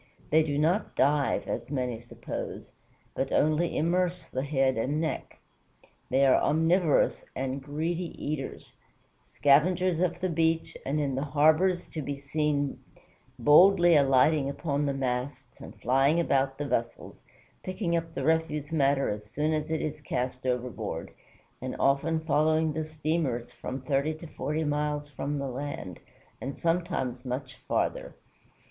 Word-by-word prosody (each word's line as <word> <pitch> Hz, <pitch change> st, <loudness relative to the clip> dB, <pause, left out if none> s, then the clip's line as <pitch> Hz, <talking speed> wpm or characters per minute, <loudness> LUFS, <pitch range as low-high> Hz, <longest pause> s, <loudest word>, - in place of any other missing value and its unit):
They 160 Hz, +1 st, +6 dB
do 145 Hz, -2 st, -1 dB
not 170 Hz, +8 st, +1 dB
dive, 140 Hz, +1 st, +2 dB
as -, -, -4 dB
many 125 Hz, -5 st, -2 dB
suppose, 120 Hz, +1 st, -7 dB, 0.4 s
but -, -, -2 dB
only 155 Hz, +3 st, +2 dB
immerse 180 Hz, +3 st, 0 dB
the 130 Hz, -, -3 dB
head 135 Hz, -2 st, +1 dB
and 135 Hz, +7 st, -1 dB
neck. 160 Hz, -1 st, -3 dB, 0.7 s
They 135 Hz, +2 st, +4 dB
are 130 Hz, -, +5 dB
omnivorous 165 Hz, +1 st, +2 dB
and 135 Hz, +1 st, -3 dB
greedy 160 Hz, +5 st, -2 dB
eaters; 145 Hz, -2 st, -5 dB, 0.5 s
"scavengers 165 Hz, +6 st, +3 dB
of 175 Hz, -1 st, 0 dB
the 185 Hz, -, 0 dB
beach, 165 Hz, -1 st, 0 dB
and 145 Hz, +3 st, 0 dB
in 140 Hz, -2 st, 0 dB
the 130 Hz, -, -1 dB
harbors 155 Hz, +5 st, +3 dB
to 155 Hz, -, -5 dB
be 140 Hz, 0 st, -4 dB
seen 145 Hz, 0 st, -1 dB, 0.6 s
boldly 175 Hz, +3 st, +6 dB
alighting 140 Hz, +1 st, +4 dB
upon 145 Hz, 0 st, -1 dB
the 140 Hz, -, 0 dB
masts 130 Hz, 0 st, -3 dB
and -, -, -11 dB
flying 135 Hz, +6 st, +3 dB
about 135 Hz, -4 st, +1 dB
the 145 Hz, -, -3 dB
vessels, 120 Hz, -4 st, -3 dB, 0.4 s
picking 185 Hz, -2 st, -2 dB
up 165 Hz, -1 st, -3 dB
the 135 Hz, -, -2 dB
refuse 160 Hz, -1 st, 0 dB
matter 140 Hz, -3 st, +2 dB
as 105 Hz, 0 st, -4 dB
soon 150 Hz, +5 st, 0 dB
as 155 Hz, 0 st, -2 dB
it 160 Hz, -1 st, -1 dB
is 150 Hz, 0 st, -4 dB
cast 125 Hz, -2 st, -3 dB
overboard, 120 Hz, -8 st, -3 dB, 0.5 s
and -, -, -4 dB
often 145 Hz, +4 st, +2 dB
following 155 Hz, 0 st, +2 dB
the 155 Hz, +1 st, -2 dB
steamers 155 Hz, -6 st, -2 dB
from 130 Hz, +1 st, -6 dB
thirty 140 Hz, +4 st, 0 dB
to 155 Hz, -, -11 dB
forty 155 Hz, 0 st, -3 dB
miles 150 Hz, 0 st, -1 dB
from 145 Hz, +1 st, -3 dB
the 140 Hz, -1 st, -3 dB
land, 130 Hz, -, -5 dB, 0.4 s
and 135 Hz, +2 st, -5 dB
sometimes 165 Hz, -8 st, -1 dB
much 130 Hz, +1 st, -5 dB
farther." -, -, -1 dB
145 Hz, 145 wpm, -28 LUFS, 135-160 Hz, 0.7 s, They